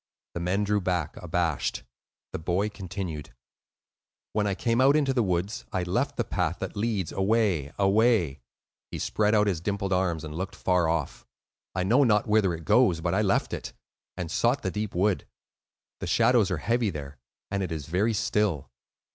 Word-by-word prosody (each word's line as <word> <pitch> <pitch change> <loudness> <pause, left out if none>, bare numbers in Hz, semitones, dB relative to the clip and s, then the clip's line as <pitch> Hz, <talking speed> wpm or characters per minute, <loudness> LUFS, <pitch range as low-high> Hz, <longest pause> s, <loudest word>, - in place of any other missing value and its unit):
The - - -4
men 90 +4 0
drew 105 0 +1
back 90 -4 -1
abashed. 85 -5 -1 0.5
The - - -3
boy 90 +6 0
continued,— 95 - -6 1.0
"When 105 -1 +1
I 100 - 0
came 115 +4 +1
out 140 +2 +5
into 140 -3 +2
the 125 - +2
woods, 95 +1 -1
I 95 -2 -1
left 125 +11 -1
the 120 - +1
path 90 -5 -1
that 95 - -5
leads 105 -4 -1
away—away,"—he 95 - 0
spread 105 0 +1
out 105 0 +4
his 95 -6 -1
dimpled 100 0 -1
arms 90 -4 0
and 75 -1 -6
looked 90 +4 -4
far 90 -3 +1
off,—"I 85 +3 -5
know 120 +9 +4
not 105 -5 +3
whither 105 -5 +2
it 80 -1 -10
goes, 95 -8 +4
but 85 +1 -1
I 100 - +2
left 100 -2 +1
it, - - -5 0.4
and 85 -3 -4
sought 125 +9 +1
the - - -1
deep 105 -3 -4
wood. 95 +2 +1 0.7
The - - -4
shadows - - +4
are - - -1
heavy 115 -1 +1
there, 70 -5 -7 0.3
and 100 -1 -1
it 90 -3 -3
is 80 -3 -4
very 95 +9 +1
still. 105 -7 0
95 Hz, 170 wpm, -27 LUFS, 85-105 Hz, 1.0 s, out